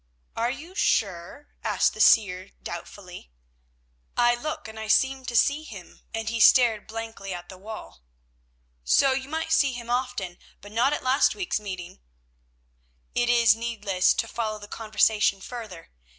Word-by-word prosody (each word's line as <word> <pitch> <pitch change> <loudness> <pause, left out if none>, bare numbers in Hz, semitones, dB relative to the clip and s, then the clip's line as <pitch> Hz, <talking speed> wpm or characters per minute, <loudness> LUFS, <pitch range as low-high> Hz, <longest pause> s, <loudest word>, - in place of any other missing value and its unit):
"Are 235 +1 0
you 300 +8 -7
sure?" 200 - -1
asked 210 -4 +2
the 215 - -3
seer 190 -4 +4
doubtfully. 175 - -9 0.9
"I 240 0 +5
look 290 +3 -5
and 220 0 -9
I 220 - -5
seem 265 +4 +2
to 240 - -5
see 280 +5 +3
him," 205 - -12
and 225 -1 -4
he 230 +1 -2
stared 225 -2 +5
blankly 225 -4 -6
at 175 0 -10
the 185 - -10
wall. 200 - -10 0.8
"So 270 - +4
you 265 +1 -2
might 320 +1 -3
see 275 -4 +3
him 240 -1 -6
often 250 -2 -1
enough, 175 0 -19 0.2
but 205 - -13
not 240 +5 +2
at - - -3
last 260 +2 +3
week's 385 - -2
meeting." 185 - -7 1.1
It 240 0 +1
is 235 -2 +5
needless 225 -5 +1
to 225 - -1
follow 220 -2 -3
the 205 -1 -11
conversation 215 -2 +1
further. 215 -6 -9
225 Hz, 160 wpm, -26 LUFS, 200-250 Hz, 1.1 s, I